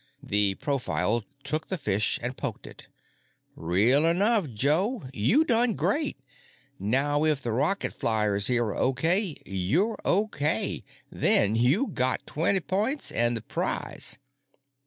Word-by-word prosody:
The 100 -1 +1
profile 120 -4 -1 0.2
took 155 0 -3
the 190 - -2
fish 105 - 0
and 125 +1 -3
poked - - -5
it. - - -10 0.7
"Real 105 - +2
enough, 195 - +2
Joe. 160 - 0
You 210 - +2
done 240 -3 +3
great. 300 -1 -1 0.6
Now 140 +8 +1
if 150 -3 +1
the 120 - -2
rocket 170 - 0
flyers 105 -3 +1
here 120 -1 +2
are 105 - -4
okay 160 - +1
you're 130 - -1
okay. 155 - 0 0.3
Then 105 +2 +2
you 130 - +2
got 130 - 0
twenny 180 +5 0
points 215 +10 -1
and 120 0 +2
the 110 - -9
prize. - - -3
140 Hz, 130 wpm, -26 LUFS, -, 0.7 s, done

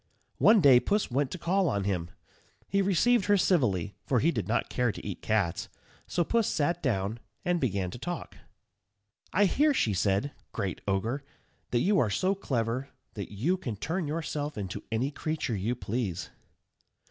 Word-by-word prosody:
One 215 -2 +6
day 135 -5 +8
Puss 205 +1 0
went 135 +2 +1
to 185 - -5
call 185 +1 +1
on 100 -1 0
him. 90 -4 -1 0.6
He 200 - +2
received 200 +3 +3
her 205 0 +4
civilly, 110 - +2
for 125 - +2
he 160 +8 +3
did 110 - -3
not 115 +3 +1
care 125 -2 +1
to - - -10
eat 100 -3 -5
cats, 100 -6 0 0.4
so 175 - +1
Puss 230 +5 +1
sat 170 +3 0
down, 110 - -1 0.3
and 175 -1 +1
began 100 -7 0
to 120 - -8
talk: 175 +3 -5 1.0
"I 205 +4 +4
hear," 290 +9 +3
she 110 - +2
said, 100 +8 +1 0.2
"great 100 -4 -3
Ogre, 110 +8 0 0.5
that 120 - +1
you 200 +5 +3
are 110 - +2
so 185 - +1
clever, 130 - -2 0.2
that 100 -3 -6
you 140 - 0
can 120 -12 -4
turn 160 - -2
yourself 150 -2 -3
into 95 -4 -4
any 120 +5 0
creature 155 -6 -2
you 105 +6 -1
please." 105 -7 -3
130 Hz, 170 wpm, -29 LUFS, -, 1.0 s, day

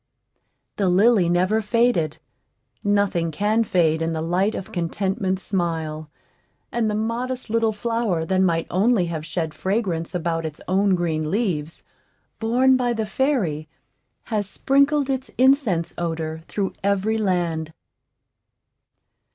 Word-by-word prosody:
The 195 -3 +2
lily 195 0 +4
never 185 +5 +2
faded; 210 -8 +1 0.7
nothing 200 -5 +1
can 210 +7 +1
fade 165 -6 +2
in 165 0 -1
the 160 - -2
light 185 +6 +1
of 190 - -6
Contentment's 190 +2 -2
smile; 160 -4 -2 0.6
and 230 -2 0
the 210 - -1
modest 235 +3 -3
little 225 -1 +2
flower 215 -6 -1
that 185 +2 +1
might 165 -3 +2
only 195 +1 +3
have 155 -1 -4
shed 160 0 -3
fragrance 185 -1 -2
about 165 -1 -1
its 155 -2 -6
own 190 +2 +3
green 160 -3 -1
leaves, 170 -7 -2 0.6
borne 250 +4 +3
by 245 -1 0
the 220 -1 -2
fairy, 205 - -1 0.5
has 210 -3 -2
sprinkled 280 +5 +2
its 265 -3 -2
incense 255 - +3
odor 160 -2 -3
through 200 -2 -2
every 200 +3 +1
land. 170 -5 -1
190 Hz, 125 wpm, -23 LUFS, 165-225 Hz, 0.7 s, lily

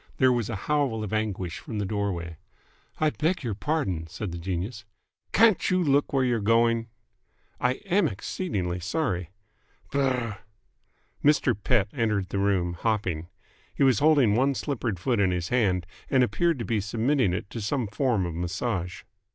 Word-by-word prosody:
There 130 -1 +5
was 120 -3 -1
a - - -2
howl 140 -7 +1
of 105 - -5
anguish 95 -6 -2
from 110 - -6
the 105 - -1
doorway. 95 -5 -3 0.6
"I 155 -1 +2
beg 165 +3 -1
your 115 -4 -2
pardon!" 100 - -1
said 100 +3 -5
the 85 - -5
genius. 95 +6 -4 0.5
"Can't 225 -5 +4
you 185 -1 +2
look 145 -2 +2
where 135 -1 +2
you're 120 -2 +1
going!" 115 +2 +3 0.7
"I 125 0 +2
am 190 -1 +3
exceedingly 95 - -3
sorry 90 - -2 0.3
" - - -35
"Brrh!" 125 -6 0 0.8
Mr. 145 -4 +4
Pett 105 0 +1
entered 105 -7 0
the 100 - -2
room, 95 -3 +1
hopping. 90 -4 -1 0.5
He - - +2
was 130 -6 +4
holding 145 -8 +5
one 135 +5 +2
slippered 120 - -2
foot 120 +5 0
in 100 -2 +3
his 90 -1 -2
hand 95 -8 +2 0.2
and 130 -2 +4
appeared 170 +5 +1
to 115 - -4
be 110 -3 0
submitting 115 +2 +1
it 90 +2 -3
to 115 - -5
some 120 +4 -1
form 110 -2 0
of 85 - -4
massage. 90 +2 -3
110 Hz, 165 wpm, -27 LUFS, 95-135 Hz, 0.8 s, There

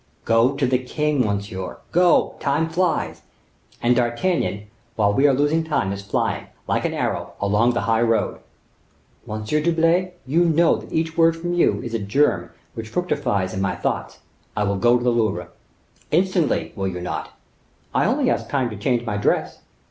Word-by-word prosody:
Go 115 +4 +3
to 140 -1 +1
the 125 0 +2
king, 150 +3 -1
monsieur; 100 -2 -4
go; 175 0 +4
time 150 +4 0
flies, 175 +1 -1 0.6
and 120 +1 +4
D'Artagnan, 120 - 0 0.3
while 100 -2 +2
we 135 +6 +4
are 140 - +4
losing 145 +4 +2
time, 145 -11 -1
is 100 - -6
flying, 100 - -2 0.2
like - - 0
an - - -1
arrow, - - -2
along 105 +4 +2
the - - +1
high 115 +1 +1
road." 115 -1 +1 0.9
"Monsieur 110 +8 -1
d'Herblay, 170 +3 +2
you 160 +7 +2
know 165 0 +4
that - - -11
each 160 0 -1
word 165 0 +5
from 175 +1 -3
you 175 - +2
is 120 - -6
a 115 - 0
germ 100 -4 +1 0.2
which 110 -1 -7
fructifies 120 - -1
in 95 - -2
my 95 - 0
thoughts. - - -3 0.4
I 105 - +2
will 100 -1 0
go 120 +4 +4
to 120 - -4
the 125 - +3
Louvre." 110 -7 0 0.6
"Instantly, 180 -1 +1
will 95 -2 -2
you 90 -1 -4
not?" 90 0 -5 0.6
"I - - +2
only - - +1
ask - - -2
time 130 -4 0
to 105 - -7
change 120 +3 0
my 105 -3 -2
dress." 105 - 0
125 Hz, 180 wpm, -22 LUFS, 105-160 Hz, 0.9 s, word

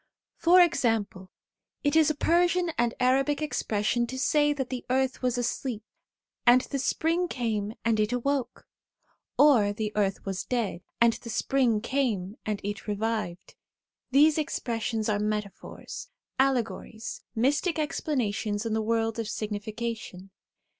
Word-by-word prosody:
For 355 +2 +6
example, 220 - +1 0.5
it 290 +1 +1
is 315 -2 +5
a 305 - 0
Persian 345 +2 +2
and 235 0 0
Arabic 270 +3 +2
expression 240 -5 0
to 260 - -6
say 295 +2 +3
that 270 -3 -3
the 255 -1 -4
earth 260 0 0
was 250 -1 0
asleep, 240 -2 -2 0.6
and 250 +1 +6
the 275 +1 -4
spring 330 +6 +1
came 220 -7 -2
and 225 -2 +2
it 210 +1 +1
awoke; 250 0 -2 0.7
or 240 -9 +5
the 210 0 -3
earth 200 -2 0
was 195 -1 -3
dead, 230 -8 -2 0.2
and 235 -1 +5
the 230 - -9
spring 230 -1 +1
came 225 -7 -1
and 210 -2 -1
it 205 +1 -5
revived. 210 -4 -3 0.6
These 295 +4 +5
expressions 230 -6 -2
are 210 -2 +1
metaphors, 210 -1 -4 0.3
allegories, 245 -3 -1
mystic 280 +9 +1
explanations 230 -9 -1
in 225 - -1
the 220 - +1
world 225 +1 0
of 225 - -2
signi 210 -1 -3
fication. 215 -4 -6
235 Hz, 140 wpm, -27 LUFS, 215-275 Hz, 0.7 s, For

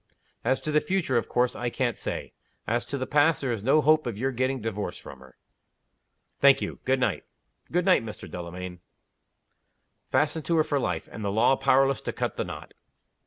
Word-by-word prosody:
"As 130 +3 +1
to 155 - -3
the 150 0 +3
future, 185 -9 0
of 115 - -1
course 125 0 +1
I 120 - -2
can't 120 -1 -1
say. - - -5 0.3
As 120 +2 -1
to 140 - -3
the 130 - -2
past, 150 +3 +3
there 135 -3 -2
is 115 -4 -2
no 135 +7 +4
hope 155 -1 +4
of 115 -4 -4
your 135 +4 0
getting 130 +1 -1
divorced 105 -2 -4
from 65 - -11
her." 65 -1 -17 1.0
"Thank 140 -1 +6
you. - - -5
Good 130 0 +2
night." 115 -7 0 0.5
"Good 180 +1 +1
night, 185 -10 +4
Mr. 105 -4 -8
Delamayn." 90 +1 -7 1.3
Fastened 150 +3 +1
to 170 - +1
her 155 - +5
for 145 -2 0
life - - -2
and 110 - -7
the 100 - 0
law 115 +6 +4
powerless 135 0 +3
to - - -4
cut - - -2
the - - -1
knot. - - -8
130 Hz, 200 wpm, -27 LUFS, 115-145 Hz, 1.3 s, Thank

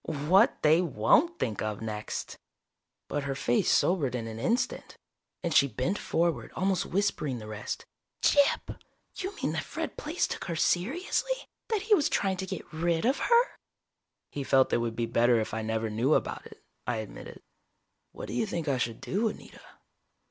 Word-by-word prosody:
"What 160 +8 +3
they 155 +3 +6
won't 180 - +3
think 105 -4 -2
of 105 -1 -2
next!" 110 -1 -5 0.7
But 145 -1 -2
her 135 -1 -2
face 120 -2 +1
sobered 150 -9 +2
in 115 -2 -3
an 110 0 -6
instant, 230 - -1 0.5
and 170 -2 0
she 140 - +6
bent 135 - -2
forward, 170 0 0
almost 190 -1 0
whispering 160 -9 0
the 110 - -8
rest: 110 0 -5 0.4
"Gyp! 285 -1 +3 0.4
You 380 +1 -4
mean - - -2
that - - -1
Fred - - -5
Plaice 315 +4 -1
took - - -5
her 170 - -3
seriously! 350 - 0 0.2
That 435 -4 -1
he 430 0 +3
was 310 -8 +4
trying 190 -1 0
to 190 0 -4
get - - -5
rid 165 +3 0
of 265 +4 +2
her?" 475 +1 +5 0.9
"He 140 - -4
felt 135 0 +3
it - - +5
would 115 -1 -2
be 115 - 0
better 120 +1 +3
if 110 - -3
I 110 - -1
never 110 0 -2
knew 120 +8 +2
about - - -2
it," - - -16 0.2
I 120 - 0
admitted. 110 -2 -8 0.7
"What - - -8
do - - -6
you 220 - 0
think 170 -5 -3
I 135 -3 +1
should 115 -2 -2
do, 215 +5 0
Anita?" 215 - -8
155 Hz, 180 wpm, -29 LUFS, -, 0.9 s, they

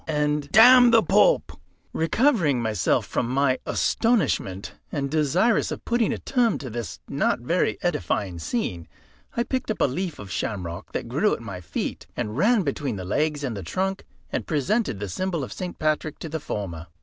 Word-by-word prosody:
and 150 -1 0
"D 245 +3 +8
the 230 -1 +5
Pope!" - - +4 0.4
Recovering 165 - +2
myself 110 -5 +1
from 120 - -2
my 130 0 +2
astonishment, 150 - 0 0.2
and 140 -1 -2
desirous 160 - +2
of - - -6
putting 235 -2 +1
a - - -2
term 245 -5 +1
to 130 -4 -7
this 115 -1 -5
not 140 -3 0
very 170 +9 0
edifying 105 - -1
scene, 90 - -3 0.5
I 235 - +3
picked 255 -1 -3
up 215 - -2
a - - +4
leaf 170 +4 -3
of 100 -1 -9
shamrock, 90 -2 -4
that - - -3
grew 150 - +1
at - - -11
my 100 -6 -7
feet, 80 -2 -4
and 105 0 -3
ran 210 - +3
between 140 -4 -2
the 95 -2 -6
legs 150 +8 0
and 125 -5 -2
the 100 - -5
trunk, 190 - -2 0.3
and - - -3
presented 155 - 0
the 105 - -4
symbol 170 - -2
of - - -6
St. 180 -1 -6
Patrick 155 0 -1
to 165 - -7
the 160 +1 -3
former. 90 - -5
150 Hz, 180 wpm, -24 LUFS, -, 0.5 s, D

